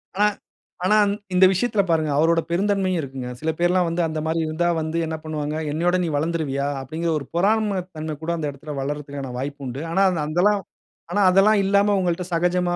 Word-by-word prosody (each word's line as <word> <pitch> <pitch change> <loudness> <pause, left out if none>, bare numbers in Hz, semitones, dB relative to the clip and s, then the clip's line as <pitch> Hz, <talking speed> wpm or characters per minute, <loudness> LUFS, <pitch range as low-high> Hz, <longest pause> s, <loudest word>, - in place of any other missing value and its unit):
ஆனா 205 +2 +4 0.6
ஆனா, 210 - +4 0.2
இந் 205 - -5
இந்த 185 +1 +6
விஷயத்தில 205 +2 +1
பாருங்க 155 -2 +2
அவரோட 165 +3 +3
பெருந்தன்மையும் 190 0 +1
இருக்குங்க. 135 -3 -6
சில 160 +3 0
பேர்லாம் 175 0 +2
வந்து 170 +1 -1
அந்த 155 -1 -3
மாரி 160 +1 0
இருந்தா 155 +2 0
வந்து 160 +1 -2
என்ன 160 0 -3
பண்ணுவாங்க, 150 -1 -3 0.2
"என்னையோட 175 +4 +1
நீ - - -1
வளர்ந்துருவியா?" 145 -3 -1 0.2
அப்படீங்கிற 160 +6 -3
ஒரு 140 - -9
பொறாமை 210 +2 +2 0.2
தன்மை 155 0 -4
கூட 165 - -2
அந்த 155 - -3
இடத்தில 145 +2 -8
வளர்றதுக்கான 140 -1 -4
வாய்ப்பு 140 +2 -5
உண்டு. 130 +3 -5
ஆனா, 190 +4 +2
அந் 170 - -2
அந்தெல்லாம் 190 +6 +2 0.5
ஆனா, 205 - +1
அதெல்லாம் 195 +4 +5
இல்லாம 200 +1 +3
உங்கள்ட்ட 180 0 -1
சகஜமா 175 +1 +1
170 Hz, 185 wpm, -23 LUFS, 150-185 Hz, 0.6 s, இந்த